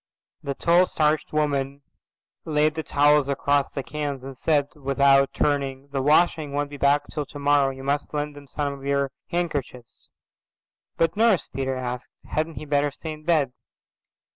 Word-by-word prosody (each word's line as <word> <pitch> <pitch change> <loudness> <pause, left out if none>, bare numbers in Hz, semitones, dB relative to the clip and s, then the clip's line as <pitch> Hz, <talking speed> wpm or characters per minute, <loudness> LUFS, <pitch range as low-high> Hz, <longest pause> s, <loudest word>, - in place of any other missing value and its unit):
The 140 -1 -4
tall 175 +5 +4
starched 155 0 +1
woman 140 -2 -1 0.6
laid 155 0 +2
the 160 - -3
towels 145 -1 +3
across 140 0 +1
the 135 - -5
cans 145 -2 -4
and 135 0 -8
said, 145 +1 +1
without 140 -1 +3
turning, 140 -1 -1
"The 140 -1 -2
washing 150 0 +3
won't 145 0 -2
be 145 - -7
back 140 +1 +3
till 150 - -2
tomorrow. 145 -1 +2
You 135 0 -8
must 145 +1 -1
lend 150 0 -3
him 145 -1 -12
some 145 +1 -2
of 140 -1 -11
your 140 -1 0 0.2
handkerchiefs." 145 -8 -4 0.9
"But, 165 0 +1
Nurse," 220 -4 +3
Peter 135 -1 -2
asked, 125 -1 -5 0.2
"hadn't 155 +1 -2
he - - -7
better 145 0 +1
stay 155 +3 -7
in 155 0 -10
bed?" 150 -7 +2
145 Hz, 165 wpm, -24 LUFS, 140-150 Hz, 0.9 s, tall